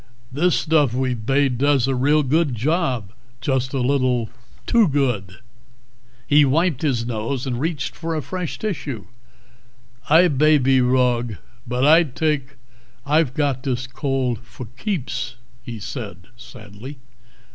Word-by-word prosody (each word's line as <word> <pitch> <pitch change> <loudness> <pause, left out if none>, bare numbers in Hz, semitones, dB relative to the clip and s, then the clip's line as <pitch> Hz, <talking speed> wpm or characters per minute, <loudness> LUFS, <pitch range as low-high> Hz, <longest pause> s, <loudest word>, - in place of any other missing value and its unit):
"This 170 +7 +2
stuff 150 -6 +2
we've 125 -4 -2
bade 135 -3 +2
does 140 -2 +3
a 135 - +1
real 145 +4 +3
good 145 0 +1
job. 125 - -1 0.3
Just 130 -3 -1
a 140 - -2
little 125 -3 +1 0.3
too 230 -4 +4
good." 125 - -1 0.9
He 150 +1 +5
wiped 150 +1 +1
his 125 -7 0
nose 120 +3 -3
and 125 -3 -3
reached 155 -1 -3
for 165 -1 -4
a 155 - -2
fresh 180 -3 -4
tissue. 145 - -4 1.0
"I 165 +4 +6
bay 155 0 +4
be 135 -1 +3
wrog, 125 -3 +1 0.3
but 125 +2 0
I 160 +3 +7
thik 140 -1 -2 0.5
I've 150 -2 +2
got 140 -4 0
this 130 -2 -2
cold 130 -2 -2
for 125 +1 -10
keeps," 130 - -3 0.3
he 120 -2 -7
said 100 -5 -7
sadly. 120 +3 -11
130 Hz, 135 wpm, -21 LUFS, 125-150 Hz, 1.0 s, I